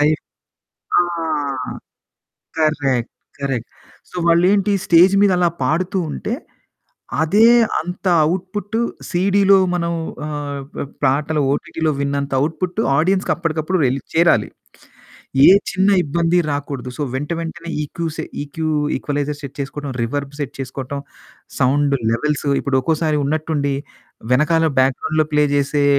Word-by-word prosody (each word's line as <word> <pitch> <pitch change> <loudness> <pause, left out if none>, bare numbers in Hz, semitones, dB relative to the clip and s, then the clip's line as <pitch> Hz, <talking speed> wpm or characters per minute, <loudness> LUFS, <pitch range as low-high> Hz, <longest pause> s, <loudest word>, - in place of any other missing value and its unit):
ఫై 150 - +4 0.9
ఆ! - - +6 1.6
Correct. 140 -6 +1 0.3
Correct. 135 -4 -3 0.4
So, - - -14
వాళ్ళేంటీ, 190 +4 +4
stage 175 +2 +6
మీదలా 180 -3 +4 0.2
పాడుతూ 175 +7 0
ఉంటే, 220 - -4 0.9
అదే 205 +8 +4 0.3
అంత 180 +3 -5 0.2
అవుట్‌పుట్టు 190 +6 -2 0.3
సీడీలో 195 +2 +4 0.2
మనం 170 -1 -1 0.3
ఆహ్, 145 -2 -4
ప - - -3 0.2
పాటలు 150 +3 +1
ఓటీటీ‌లో 160 +2 -1
విన్నంత 140 0 -1
అవుట్‌పుట్టు 165 +8 -1 0.2
ఆడియన్స్‌కప్పడకప్పుడు 170 -1 0
వెళ్ళి 130 +2 0
చేరాలి. 165 -10 +3 1.0
ఏ - - +9 0.2
చిన్న 190 +1 +2 0.2
ఇబ్బంది 170 +4 +1
రాకూడదు. 140 -3 -4
సో, - - -1
వెంట 145 +4 -3
వెంటనే 170 +1 -6
ఈకూసె 160 +1 -4 0.2
ఈక్యూ 155 +2 -4 0.3
ఈక్వలైజర్ 145 0 -3
సెట్ 140 -2 -8
చేసుకోడం, 140 +1 -5
రివర్బ్ 140 +4 -3
సెట్ 140 -2 -4
చేసుకోటం, 135 +1 -5 0.6
సౌండు 140 +1 +2
లెవెల్స్ 150 +5 -1
ఇప్పుడొక్కోసారి 150 +3 +1
ఉన్నట్టుండి 145 -1 -1 0.6
వెనకాల 160 +4 +3
బ్యాక్‌గ్రౌం‌డ్‌లో 155 +4 +1
ప్లే 150 0 +4
జేసే 145 +1 +1
155 Hz, 110 wpm, -19 LUFS, 140-170 Hz, 1.6 s, ఏ